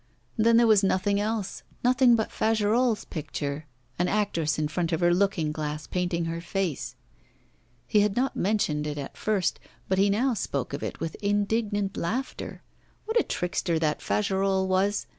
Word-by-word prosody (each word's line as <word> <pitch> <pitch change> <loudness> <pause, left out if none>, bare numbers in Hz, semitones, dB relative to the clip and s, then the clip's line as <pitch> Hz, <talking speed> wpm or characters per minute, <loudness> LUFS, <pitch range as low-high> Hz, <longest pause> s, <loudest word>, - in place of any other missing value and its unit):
Then 230 +1 +4
there 235 - +6
was 215 -3 +5
nothing 195 +1 +2
else, 210 -1 -2 0.2
nothing 250 -1 +5
but 220 -1 -1
Fagerolles' 225 +1 +1
picture 150 -1 -4 0.3
an 180 - +2
actress 175 -7 0
in 155 -1 0
front 170 +2 -2
of 160 - 0
her 175 -1 +4
looking 175 -5 +1
glass 150 0 -4
painting 175 -2 -1
her 165 0 -3
face. 175 -3 -3 0.9
He 215 - +3
had 205 -1 +2
not 260 +2 0
mentioned 165 -7 0
it 150 0 -4
at 140 -1 -6
first; 205 -5 0 0.3
but 190 0 +1
he 200 +1 +4
now 245 +6 +2
spoke 140 - -3
of 140 - -3
it - - -5
with 165 0 -3
indignant 205 0 0
laughter. 240 +10 -4 0.4
What 445 +2 +2
a - - +2
trickster 180 -1 -1
that 155 -2 0
Fagerolles 195 -2 +1
was! 190 +2 +1
195 Hz, 165 wpm, -27 LUFS, 165-215 Hz, 0.9 s, there